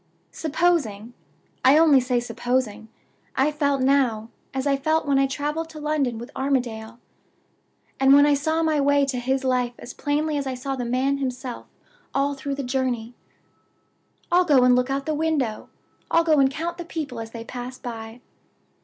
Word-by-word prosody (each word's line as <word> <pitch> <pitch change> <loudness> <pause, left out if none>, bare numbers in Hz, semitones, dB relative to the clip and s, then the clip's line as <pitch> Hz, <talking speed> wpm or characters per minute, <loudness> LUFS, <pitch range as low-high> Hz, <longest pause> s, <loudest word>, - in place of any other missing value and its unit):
"Supposing 285 -9 0 0.5
I 265 +3 +6
only 310 -4 +6
say 250 -1 0
supposing 240 -2 -2 0.5
I 275 +3 +2
felt 285 -3 0
now, 245 -5 +1 0.2
as 265 0 -3
I 280 -1 +3
felt 315 +4 0
when 280 -2 +2
I 275 - +3
traveled 295 +4 -3
to 315 -1 -10
London 295 -6 -1
with 235 +2 -8
Armadale; 235 -4 -2 1.0
and 270 0 +5
when 285 0 +7
I 295 - +4
saw 315 +3 0
my 310 -2 +2
way 285 0 +3
to 260 -2 -2
his 265 +2 -1
life 250 -2 0
as 240 - -9
plainly 300 +1 -1
as 280 -1 -2
I 260 - -3
saw 270 +2 -4
the 250 -2 -4
man 260 +3 0
himself 255 -2 -5 0.5
all 280 +1 +1
through 275 0 -4
the 280 - -4
journey...? 250 -2 -2 1.2
"I'll 355 +1 +5
go 285 -7 +4
and 250 0 +5
look 250 +1 +1
out 275 +1 0
of - - -22
the 310 - -1
window. 295 -8 -1 0.4
I'll 335 - +4
go 315 -3 +3
and 270 -1 +5
count 335 +5 -4
the 345 - -5
people 295 -8 -5
as 225 0 -6
they 230 0 -8
pass 250 +1 -7
by. 225 0 -8
270 Hz, 180 wpm, -24 LUFS, 245-295 Hz, 1.2 s, when